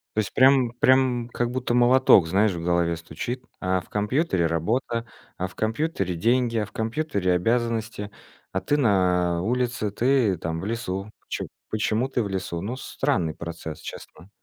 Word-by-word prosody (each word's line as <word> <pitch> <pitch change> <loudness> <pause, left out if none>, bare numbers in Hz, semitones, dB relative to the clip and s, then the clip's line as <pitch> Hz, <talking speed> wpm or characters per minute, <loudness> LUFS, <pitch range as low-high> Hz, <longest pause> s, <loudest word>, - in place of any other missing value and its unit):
То - - +1
есть 105 - -1
прям, 130 -2 +5
прям 125 -1 +3
как 120 0 -1
будто 125 -1 -2
молоток, 125 -7 +6
знаешь, 100 +5 +3
в 85 - -5
голове 85 -1 +1
стучит: 100 +11 -5 0.2
а 95 -1 0
в - - -20
компьютере 105 - +1
работа, 115 +8 -1 0.3
а 95 - -2
в - - -16
компьютере 110 - -1
деньги, 115 +5 +1
а 105 - +1
в - - -16
компьютере 110 - -1
обязанности, 115 +1 -1 0.4
а 95 - -1
ты 145 - +1
на 90 -7 +2
улице, 120 0 -1
ты 115 -3 +2
там 80 0 -3
в - - -5
лесу. 100 -3 -3 0.2
Чё - - -3 0.3
почему 110 +4 0
ты 125 - 0
в 100 - -3
лесу? 90 -3 -3
Ну, 115 +6 -3
странный 130 - -1
процесс, 80 -2 -7
честно. 95 - -10
110 Hz, 165 wpm, -25 LUFS, 90-125 Hz, 0.4 s, молоток